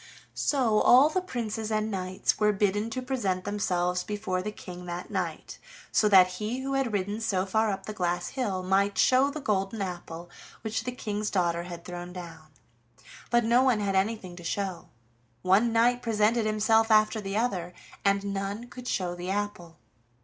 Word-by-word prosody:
So 240 -7 +2
all 265 +5 +7
the 370 +4 0
princes 225 - -4
and 215 0 0
knights 185 -1 -1
were 210 -1 +4
bidden 205 +2 0
to 255 +3 -4
present 205 -9 -1
themselves 180 -3 0
before 205 -3 -2
the 210 +3 -4
King 180 -3 -10
that 175 +4 -6
night, 180 -5 -4 0.3
so 210 - +3
that 190 -3 +8 0.2
he 235 +5 -2
who 275 +1 -3
had 270 -3 0
ridden 205 +2 -2
so 195 -4 0
far 220 +3 +1
up 195 - -4
the 215 - -5
glass 175 -3 -1
hill 205 -9 -2
might 195 +1 +1
show 260 +2 +4
the 295 +2 -5
golden 205 -3 -1
apple 175 -3 -5 0.4
which 220 +1 -2
the 250 - -2
King's 210 -3 -3
daughter 170 -2 0
had 175 -1 -8
thrown 175 0 -7
down. 165 -3 -9 0.8
But 240 0 +3
no 235 +2 +4
one 255 -4 +3
had 200 -1 -1
anything 190 -2 -1
to 175 - -10
show. 190 +1 -3 0.5
One 200 +6 +4
knight 240 +2 +3
presented 220 0 +2
himself 220 +1 +3
after 215 0 +4
the 195 0 -3
other, 190 -7 -1 0.3
and 200 0 +1
none 200 +4 -4
could 250 0 -9
show 180 -6 -1
the 175 +1 -6
apple. 195 -5 -3
205 Hz, 180 wpm, -28 LUFS, 185-225 Hz, 0.8 s, that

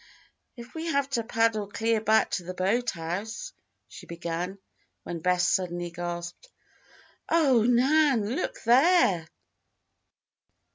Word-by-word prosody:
"If 235 +1 -11
we 325 +1 -5
have 280 -3 0
to 235 -3 0
paddle 225 -2 0
clear 225 +2 0
back 220 0 +2
to 180 - -2
the 180 +1 -7
boathouse," 200 - -2 0.3
she - - -13
began, 170 +2 -4 0.5
when 170 - -5
Bess 180 +2 +1
suddenly 175 -2 -1
gasped: 175 - -6 0.8
"Oh, 280 -8 +4
Nan! 265 -2 +3
Look 365 - -4
there!" 240 - +4
220 Hz, 110 wpm, -27 LUFS, 175-255 Hz, 0.8 s, Oh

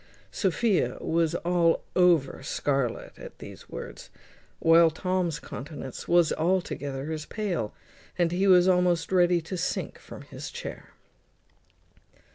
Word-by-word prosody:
Sophia 200 +1 +1
was 165 0 0
all 170 -1 +2
over 170 -8 +3
scarlet 135 -2 -2
at - - -10
these - - -11
words, - - -8 0.5
while 165 0 +6
Tom's 175 0 -1
countenance 135 -1 -8
was 175 -2 +4
altogether 155 -5 -1
as 155 -1 -5
pale, 185 - -2 0.5
and 175 -2 +2
he 190 +3 +1
was 180 -1 +6
almost 180 -2 +2
ready 175 -2 +4
to 160 +4 -6
sink 175 - -3
from - - -11
his - - -8
chair. - - -8
170 Hz, 120 wpm, -27 LUFS, 155-180 Hz, 0.5 s, while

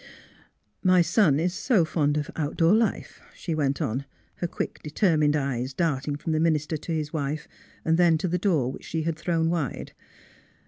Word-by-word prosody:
*' - - -45
My 180 -1 +6
son 165 -4 +3
is 175 +2 0
so 200 -2 +2
fond 150 -2 0
of 150 - -3
outdoor 165 +3 +2
life," 220 -1 0
she 170 - -4
went 140 -3 0
on, 130 +5 -2 0.3
her 175 - -2
quick, - - -4
determined 150 -2 +2
eyes 135 -2 -2
darting 145 -4 0
from 150 +3 -4
the 155 - +1
minister 155 -1 +1
to 155 +2 -6
his 155 -1 -2
wife, 150 0 -3 0.4
then 165 0 +4
to 170 - -2
the 180 +1 0
door 160 - +1
which - - -10
she 160 -1 -2
had 165 0 -1
thrown 165 0 0
wide. 160 -7 -3
160 Hz, 180 wpm, -26 LUFS, 145-170 Hz, 0.4 s, My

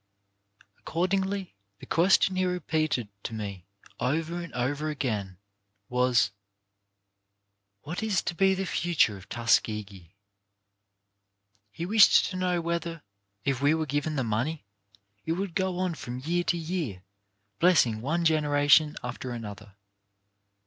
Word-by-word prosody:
Accordingly 190 +2 -1 0.2
the - - -12
question 185 +2 +3
he 185 - +1
repeated 155 - 0
to 110 - -5
me 100 -4 -6 0.3
over 160 +7 -1
and 170 - -8
over 145 +5 -1
again 105 - -3 0.5
was: 125 -4 +2 1.5
"What 170 +7 -5
is 215 -5 0
to - - -2
be 190 +2 +3
the 190 +1 -2
future 165 - +2
of 95 0 -13
Tuskegee?" 105 -6 0 1.6
He 165 - -5
wished 210 +2 +6
to - - -5
know 180 -1 0
whether, 170 -1 -3 0.4
if 135 -2 0
we 145 +3 +4
were 160 -1 -1
given 145 +2 -1
the 135 - 0
money, 125 +6 -2 0.6
it 160 - -1
would 190 0 -3
go 190 0 -1
on 185 -1 0
from 125 -5 -6
year 170 +7 -1
to 175 - +1
year, 160 - -4 0.6
blessing 135 -11 +4
one 165 +7 -1
generation 150 -1 +4
after 125 +1 -5
another. 110 -4 -8
155 Hz, 130 wpm, -28 LUFS, 120-175 Hz, 1.6 s, wished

